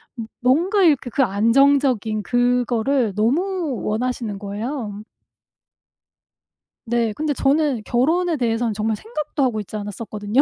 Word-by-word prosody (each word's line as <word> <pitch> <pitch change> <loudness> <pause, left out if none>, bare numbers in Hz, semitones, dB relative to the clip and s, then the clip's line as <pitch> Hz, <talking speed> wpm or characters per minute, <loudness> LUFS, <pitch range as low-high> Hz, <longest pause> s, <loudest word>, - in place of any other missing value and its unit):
뭐 230 - -5 0.2
뭔가 340 - +2
이렇게 285 -6 +3
그 275 - +2
안정적인 230 0 +2
그거를 245 -1 +1
너무 305 - 0
원하시는 220 -2 -2
거예요. 210 +1 -5 1.8
네 235 -1 0
근데 300 +4 -1
저는 275 -3 +1
결혼에 320 +7 +1
대해서는 230 -2 0
정말 215 +1 -1
생각도 300 - -4
하고 230 -4 0
있지 210 +1 -7
않았었거든요. 210 +3 -1
245 Hz, 290 characters per minute, -21 LUFS, 215-280 Hz, 1.8 s, 이렇게